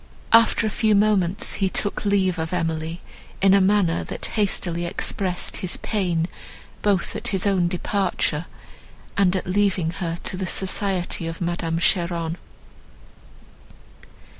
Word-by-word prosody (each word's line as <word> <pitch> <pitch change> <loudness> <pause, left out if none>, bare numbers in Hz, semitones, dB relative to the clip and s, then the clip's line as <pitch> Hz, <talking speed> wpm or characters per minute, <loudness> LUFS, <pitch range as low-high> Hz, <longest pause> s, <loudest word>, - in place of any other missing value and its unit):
After 230 0 +5
a 215 - 0
few 215 0 +2
moments 200 -2 +2
he 190 - +3
took 205 +2 -1
leave 190 -3 +2
of 160 +2 -3
Emily, 165 0 -2 0.4
in 195 0 +5
a 200 - +5
manner, 190 -3 +2
that - - -5
hastily 175 -5 0
expressed 180 +1 -2
his 185 -3 -1
pain 175 -6 -1 0.5
both 200 -4 +1
at - - -3
his 190 0 -1
own 190 -3 +2
departure, 180 -3 -1 0.7
and 195 -2 +3
at 185 - -2
leaving 185 -3 +1
her 170 -2 -3
to 185 - +1
the 185 -1 -2
society 190 -3 0
of 165 0 -5
Madame 170 -1 -2
Cheron. 170 -2 0
185 Hz, 135 wpm, -23 LUFS, 170-200 Hz, 0.7 s, After